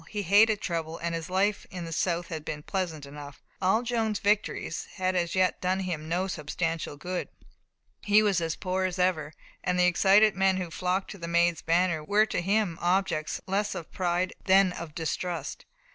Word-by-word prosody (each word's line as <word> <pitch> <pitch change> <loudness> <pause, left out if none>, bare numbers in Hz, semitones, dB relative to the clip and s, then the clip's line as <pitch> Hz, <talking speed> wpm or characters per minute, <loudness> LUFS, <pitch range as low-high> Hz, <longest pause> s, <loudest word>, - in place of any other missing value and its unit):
He 210 -1 -3
hated 205 +3 +5
trouble, 165 -2 -3
and 170 0 -3
his 165 0 -4
life 195 +2 0
in 180 -2 -6
the 165 - -5
south 170 0 -1
had 160 -3 -5
been 150 -1 -5
pleasant 170 -7 -3
enough. 145 0 -10 0.2
All 195 +5 +3
Joan's 225 -3 0
victories 205 +1 -1
had 185 -1 0
as 175 -1 0
yet 185 -1 +2
done 185 +1 0
him 160 -4 -4
no 180 +3 0
substantial 165 -2 -3
good. 180 +4 -4 0.7
He 210 +1 +4
was 195 -4 +2
as 165 -1 -1
poor 185 0 -1
as 185 0 -2
ever, 165 -5 0 0.3
and 180 0 0
the 180 - +5
excited 195 +4 +5
men 195 -1 +3
who 180 -3 -4
flocked 185 +3 -1
to 195 - -9
the 170 - -5
Maid's 170 -1 +2
banner 170 -1 +1
were 205 +6 +3
to 210 - -2
him 195 -2 0
objects 175 -4 0
less 200 +2 -1
of 165 - -7
pride 180 0 0
than 190 -1 +5
of 165 -3 -8
distrust. 170 +1 -3
180 Hz, 190 wpm, -28 LUFS, 165-195 Hz, 0.7 s, hated